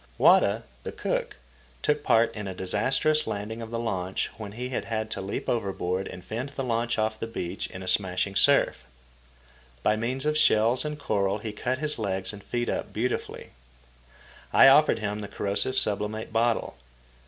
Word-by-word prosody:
Wada, - - +5 0.2
the - - -5
cook, - - -2 0.5
took 150 0 +2
part 115 -4 +3
in 105 -2 -5
a 95 - -5
disastrous 135 +11 +1
landing 105 +3 -4
of 115 - -6
the 115 - -3
launch, 95 -5 -2
when 105 -3 -8
he 125 +3 -5
had 110 -3 -3
to - - -3
leap 95 +1 -4
overboard 95 -4 -1
and 90 - -9
fend 120 +5 -4
the 140 -1 -4
launch 120 -1 0
off 110 0 0
the 115 - -3
beach 90 -4 -4
in 95 - -8
a - - -8
smashing 95 0 0
surf. 65 - +3 1.0
By 105 - +3
means 125 +5 -2
of 150 0 +2
shells 115 +4 +4
and 150 0 -3
coral 100 -7 0
he 110 +1 -5
cut 125 +5 -2
his 150 -2 -3
legs 95 -2 -2
and 100 -2 -10
feet 120 0 -2
up - - -2
beautifully. 120 +3 -3 1.0
I - - +8
offered 150 +3 +6
him 105 -1 -3
the 105 - -5
corrosive 100 +6 0
sublimate 105 +1 -1
bottle. 115 +1 +1
110 Hz, 175 wpm, -27 LUFS, 100-120 Hz, 1.0 s, I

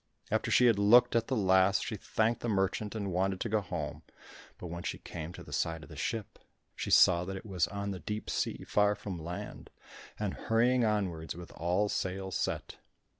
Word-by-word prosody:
After - - +1
she 125 - +5
had 115 -4 +4
looked 120 +4 +6
at 115 -1 +2
the 130 - 0
last, 95 -2 +3
she 110 - -3
thanked 110 +3 0
the 120 - -2
merchant 100 +1 0
and 100 -3 -3
wanted 95 +1 0
to 115 - -1
go 110 0 +2
home, 85 -6 -5 0.6
but - - -9
when 85 0 -5
she - - -3
came 80 0 -7
to - - -10
the - - -10
side 80 0 -1
of - - -13
the - - -10
ship, 110 -3 -4 0.4
she - - -4
saw 85 -1 +6
that 95 +1 -5
it 95 - -10
was 95 -6 0
on 100 0 -4
the 95 - -5
deep 105 +5 -5
sea - - -2
far 105 0 +3
from 95 -4 -6
land, 85 +2 -7 0.5
and - - -2
hurrying 120 +2 +2
onwards 95 -8 -1
with 85 0 -10
all 90 +5 0
sail 95 -1 -3
set. - - -3
100 Hz, 205 wpm, -31 LUFS, 90-110 Hz, 0.6 s, looked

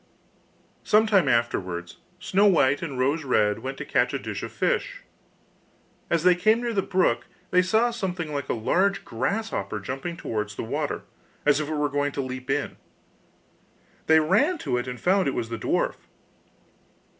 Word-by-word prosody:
Some 215 +1 +4
time 195 -8 +3
afterwards 95 -8 -1 0.2
Snow 195 +3 +3
white 145 -7 +3
and 140 -6 -5
Rose 140 +5 +1
red 105 -6 +2
went 135 +1 -5
to - - -6
catch - - +1
a - - +1
dish - - -5
of - - -6
fish. - - -1 1.1
As 170 -2 +1
they 180 0 +6
came 215 +6 +3
near 240 -1 -2
the 195 - +2
brook 185 -1 +1 0.2
they 180 - +5
saw 220 +6 +2
something 180 -8 -4
like 140 -1 -4
a - - +1
large 190 - +1
grasshopper 125 - -2
jumping 135 - -5
towards 105 -2 -4
the - - -4
water, 110 - -3 0.4
as 145 0 +4
if 155 -1 -3
it 155 - -2
were 150 0 +1
going 145 0 -1
to 140 - -2
leap 130 -1 -7
in. - - -1 1.3
They 160 0 +6
ran 210 - +2
to - - 0
it 125 - -3
and 125 -1 -6
found 190 -1 +2
it 135 - -1
was 115 -2 -3
the 115 -1 -5
dwarf. - - 0
150 Hz, 175 wpm, -25 LUFS, 125-190 Hz, 1.3 s, they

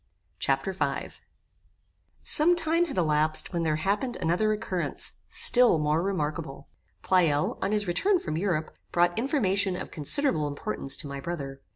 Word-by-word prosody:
Chapter 135 +8 -1
V 190 - -3 1.1
Some 335 +4 +4
time 335 0 +1
had 290 - -7
elapsed 155 0 +3
when 170 - -1
there 160 -2 0
happened 205 +9 -2
another 180 +6 0
occurrence, 210 -5 -2
still 245 -8 +5
more 150 +1 0
remarkable. 155 -6 -4 0.3
Pleyel, 165 -6 +1
on 195 - -1
his 210 -1 0
return 375 - +1
from 155 - -5
Europe, 165 -3 -2 0.2
brought 175 0 +2
information 200 -7 0
of - - -7
considerable 155 - +2
importance 140 -1 -1
to 150 - -4
my 140 0 -6
brother. 140 -5 -6
175 Hz, 145 wpm, -26 LUFS, 155-210 Hz, 1.1 s, still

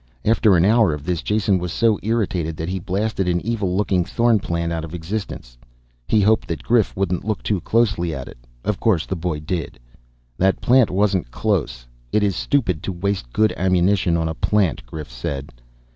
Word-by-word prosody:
After 110 -3 +4
an 85 - +4
hour 110 -6 +4
of 75 - -10
this, 85 -2 -1
Jason 105 -2 +1
was 90 -1 -4
so 110 +1 +2
irritated 95 -8 -1
that 80 +2 -4
he 95 +1 -2
blasted 100 +1 -1
an 90 -1 +1
evil 100 -5 -1
looking 95 -3 +1
thorn 115 +4 +2
plant 85 -2 -2
out 80 -1 -3
of 80 +1 -7
existence. 80 - -6 0.5
He 110 - +3
hoped 110 +2 +3
that 80 -7 -4
Grif - - +2
wouldn't 90 -2 -1
look 110 +1 -3
too 100 -4 -1
closely 105 -7 +1
at 65 -4 -6
it. - - -12 0.3
Of 105 -4 -1
course 100 -9 +2
the 95 - -3
boy 85 -3 -3
did. 80 -5 -4 0.6
"That 95 +1 +2
plant 125 -2 +4
wasn't 95 -5 +1
close. - - -1 0.3
It 105 - +2
is 100 -3 +1
stupid 95 - 0
to - - -3
waste 90 -8 -3
good 110 - +2
ammunition 90 -1 +2
on 80 -1 0
a 80 - -2
plant," 95 -2 0
Grif 75 -1 -8
said. 65 +2 -5
95 Hz, 190 wpm, -21 LUFS, 80-105 Hz, 0.6 s, After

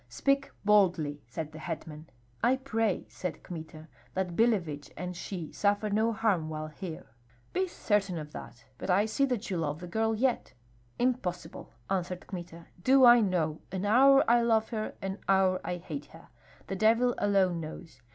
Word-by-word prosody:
"Speak 275 0 +1 0.2
boldly," 175 -8 +3
said 155 +5 -5
the 155 - -10
hetman. 155 -1 -7 0.3
"I 255 - +5
pray," 225 -6 -1
said 180 -5 -6
Kmita, 160 -2 -9 0.3
"that 180 -2 -2
Billevich 170 -11 +1
and 180 0 -5
she 170 -2 -6
suffer 205 +1 +1
no 220 +3 +2
harm 210 -8 0
while 155 0 -5
here." 160 -6 -8 0.4
"Be 375 +1 +1
certain 205 - 0
of 150 -1 -7
that. 120 -3 -10
But - - -5
I 195 +3 +4
see 250 +5 +1
that 245 -6 -3
you 180 - 0
love 150 -2 -2
the 180 - -7
girl 220 +5 0
yet." 245 - 0 0.4
"Impossible," 235 -9 -2 0.2
answered 180 -1 -2
Kmita. 175 -3 -8 0.2
"Do 265 0 +6
I 240 0 +9
know! 175 -7 0
An 190 +1 -3
hour 270 +6 +6
I 235 +1 +5
love 225 -2 +2
her, 215 -2 -4
an 195 +1 -3
hour 190 -1 +3
I 180 - -3
hate 155 -5 -6
her. 165 +1 -16 0.4
The 195 - -4
devil 230 +5 +3
alone 195 -4 +2
knows! 160 -3 -9
190 Hz, 170 wpm, -30 LUFS, 165-225 Hz, 0.4 s, I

